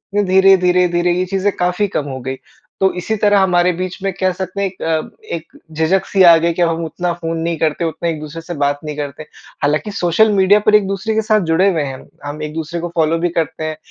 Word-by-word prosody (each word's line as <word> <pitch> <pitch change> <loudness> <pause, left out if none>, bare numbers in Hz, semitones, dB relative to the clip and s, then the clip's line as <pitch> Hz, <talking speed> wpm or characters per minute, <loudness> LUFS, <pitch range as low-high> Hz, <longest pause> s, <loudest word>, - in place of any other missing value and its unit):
फिर 205 - +3
धीरे, 190 +1 +6
धीर, 180 0 +3
धीरे 175 0 +1
ये 180 +1 0
चीज़ें 195 +2 0
काफ़ी 180 +3 +1
कम 145 - -2
हो 130 -1 -5
गई। 130 +1 -4 0.4
तो 190 0 +3
इसी 200 +5 -2
तरह 205 -1 +4
हमारे 180 -1 +3
बीच 185 +1 -4
में 195 - 0
कह 185 0 +2
सकते 185 +2 -5
हैं 200 - +1
एक 185 0 -12
अ, 160 -1 -1 0.3
एक 165 -1 -10
झिझक-सी 185 +5 +1
आ 170 -2 +9
गई 170 +1 +1
कि 175 - -3
हम 165 -1 +1
उतना 175 +3 -3
फ़ोन 165 -1 -4
नहीं 165 0 -2
करते 160 +2 0
उतना 165 +1 -2
एक 160 -2 -3
दूसरे 155 +2 -8
से 175 +2 -7
बात 145 0 0
नहीं 150 -1 -5
करते। 145 0 -5 0.4
हालाँकि 150 +8 0
सोशल 200 +3 +2
मीडिया 200 +1 +4
पर 210 - +5
एक 205 -2 +3
दूसरे 195 +3 -2
के 220 - +2
साथ 215 0 +2
जुड़े 185 +5 +4
हुए 165 -4 -1
हैं 135 -2 -4
हम। - - -14 0.2
हम 145 +1 -6
एक 150 0 -5
दूसरे 160 +1 -4
को 175 - -3
फॉलो 160 0 +2
भी 175 +1 0
करते 165 -2 -3
हैं। 155 0 -4
175 Hz, 250 wpm, -17 LUFS, 160-190 Hz, 0.4 s, आ